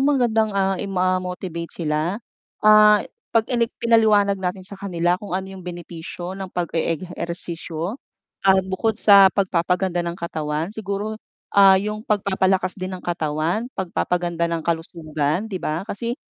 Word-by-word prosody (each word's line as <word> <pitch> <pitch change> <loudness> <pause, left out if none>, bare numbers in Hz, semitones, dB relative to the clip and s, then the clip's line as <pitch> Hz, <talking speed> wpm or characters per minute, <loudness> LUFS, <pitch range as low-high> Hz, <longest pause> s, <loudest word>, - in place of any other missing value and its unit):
magandang 245 -6 +2
ah, 195 0 +2
i-motivate 185 -3 -2
sila, 155 +3 -1 0.5
ah, 215 0 +8 0.3
'pag 225 -1 +3
inik 235 -1 +2
pinaliwanag 210 -4 +3
natin 185 0 -3
sa 200 0 -10
kanila 175 -2 0
kung 200 -3 -3
ano 190 - -3
'yung 190 - -9
benepisyo 175 0 -7
ng 195 -1 -6
pag 175 -2 -3
e-ehersisyo, 170 - -4 0.5
ah, 190 0 +7
bukod 195 +4 -1
sa 200 -3 +7
pagpapaganda 180 -1 0
ng 170 0 -3
katawan, 160 0 -3
siguro, 215 0 -4 0.3
ah, 195 -1 +7
yung 210 +2 -2
pagpapalakas 190 -3 +1
din 185 0 -4
ng 180 - -14
katawan, 165 +6 -1
pagpapaganda 175 -2 -1
ng 165 -1 -3
kalusugan 160 0 -2
'di 195 -5 -5
ba? 155 +4 -2
Kasi, 230 +4 -4
185 Hz, 135 wpm, -22 LUFS, 170-205 Hz, 0.5 s, ah